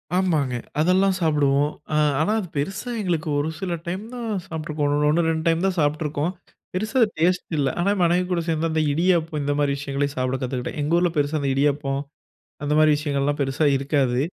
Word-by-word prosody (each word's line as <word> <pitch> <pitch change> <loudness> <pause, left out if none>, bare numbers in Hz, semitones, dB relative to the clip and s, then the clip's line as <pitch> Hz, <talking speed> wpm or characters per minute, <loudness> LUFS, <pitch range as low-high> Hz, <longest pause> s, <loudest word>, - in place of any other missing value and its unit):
ஆமாங்க. 155 -9 +1 0.2
அதெல்லாம் 185 +4 +3
சாப்பிடுவோம். 145 -2 +2 0.2
அ. - - +2 0.2
ஆனா, 160 +7 +2
அது 195 - -5
பெருசா 190 - -3
எங்களுக்கு 170 -6 -1
ஒரு 150 +2 -1
சில 185 -2 -2
டைம் 185 +4 -3
தான் 240 -2 -5 0.2
சாப்ட்ருக்கோம். 155 -2 -2 0.2
1, 165 +2 +2
2 160 -1 -1
டைம் 165 +2 +2
தான் 190 -1 -2
சாப்ட்ருக்கோம். 150 +1 0 0.4
பெரிசா 220 +7 0 0.2
டேஸ்ட் 180 +2 +1
இல்ல. 140 -2 +2
ஆனா, 195 +3 +2
மனைவி 175 +1 +2
கூட 175 -1 +1
சேர்ந்து 165 0 0
அந்த 155 0 +1
இடியாப்பம், 165 -2 +1
இந்த 145 0 0
மாரி 145 -1 +2
விஷயங்களையும் 140 0 -2
சாப்பிட 130 +1 -1
கத்துக்கிட்டேன். 125 +3 -4
எங்க 160 +4 +2
ஊர்ல 175 -1 +2
பெரிசா 145 +1 +1
இந்த 140 -1 0
இடியப்பம், 140 -1 +1 0.6
அந்த 145 - -1
மாரி 155 -1 +6
விஷயங்கள்லாம், 145 -1 -1
பெருசா 135 +3 0
இருக்காது. 135 -3 +1
155 Hz, 175 wpm, -23 LUFS, 145-175 Hz, 0.6 s, மாரி